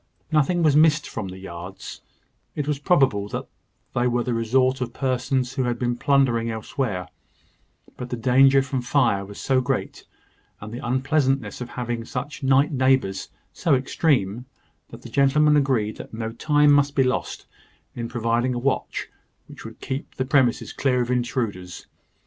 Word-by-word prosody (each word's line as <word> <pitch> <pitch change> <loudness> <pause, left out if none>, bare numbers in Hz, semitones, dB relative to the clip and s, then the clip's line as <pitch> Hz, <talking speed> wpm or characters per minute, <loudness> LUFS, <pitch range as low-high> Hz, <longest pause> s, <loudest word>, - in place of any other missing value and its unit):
Nothing 155 +3 +2
was 150 -3 +4
missed 155 0 +4
from 110 -4 -5
the 95 0 -8
yards: 95 0 -9 0.5
it 145 -1 -3
was 150 -2 -1
probable 135 - +2
that - - -5 0.5
they 120 +1 +1
were 120 0 0
the 125 - -2
resort 130 +3 +1
of 120 -1 -3
persons 130 -1 -1
who 130 -2 -1
had 120 -1 -1
been 120 0 -1
plundering 125 -4 +2
elsewhere: 110 -4 -3 0.9
but 125 - -6
the 125 - -2
danger 135 +3 +5
from 135 -2 -3
fire 120 -6 +1
was 100 +1 -10
so 130 -1 +1
great, 125 - -3 0.5
and 110 +2 -9
the 120 - -7
unpleasantness 135 -2 0
of 120 - -5
having 120 -2 -4
such 135 +5 -6
night 135 +1 +3
neighbours 130 -7 +1 0.2
so 165 -6 +2
extreme, 125 - 0 0.4
that - - -12
the - - -8
gentlemen 150 +2 +3
agreed 130 -7 +1
that - - -9
no 110 0 -4
time 145 +4 +3
must 145 0 +2
be 135 - +4
lost 130 0 -2 0.5
in 115 -1 -4
providing 120 +1 0
a - - -2
watch, 135 +3 -2 0.4
which - - -12
would - - -10
keep 135 +1 -5
the 130 - -2
premises 130 -3 +1
clear 125 -2 +1
of 120 - -4
intruders. 115 -7 -3
125 Hz, 165 wpm, -23 LUFS, 115-140 Hz, 0.9 s, danger